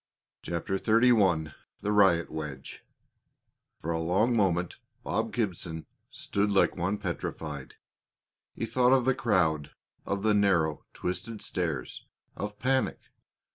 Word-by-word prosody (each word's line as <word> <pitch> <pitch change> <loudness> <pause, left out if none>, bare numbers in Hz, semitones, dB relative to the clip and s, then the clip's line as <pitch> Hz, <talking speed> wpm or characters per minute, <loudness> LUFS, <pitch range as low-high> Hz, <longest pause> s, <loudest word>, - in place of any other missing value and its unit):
CHAPTER 85 +3 -2
XXXI 105 - +3 0.3
THE 105 - -1
RIOT 95 -5 +4
WEDGE 75 -4 -7 1.0
For 85 - -3
a 80 - -1
long 95 +9 +2
moment 90 -5 +1 0.3
Bob - - -1
Gibson 85 -7 -3 0.2
stood 100 +1 -1
like 100 -1 +3
one 95 +4 -1
petrified. 75 -6 -5 0.8
He - - -2
thought 125 +3 +3
of 130 -2 +3
the 130 - +4
crowd, 90 - +1 0.3
of 100 0 -2
the 110 -1 +4
narrow, 85 -7 +2
twisted 105 +4 -4
stairs, 80 -8 -3 0.3
of 105 +1 -5
panic. 130 +2 +1
95 Hz, 120 wpm, -29 LUFS, 80-110 Hz, 1.0 s, RIOT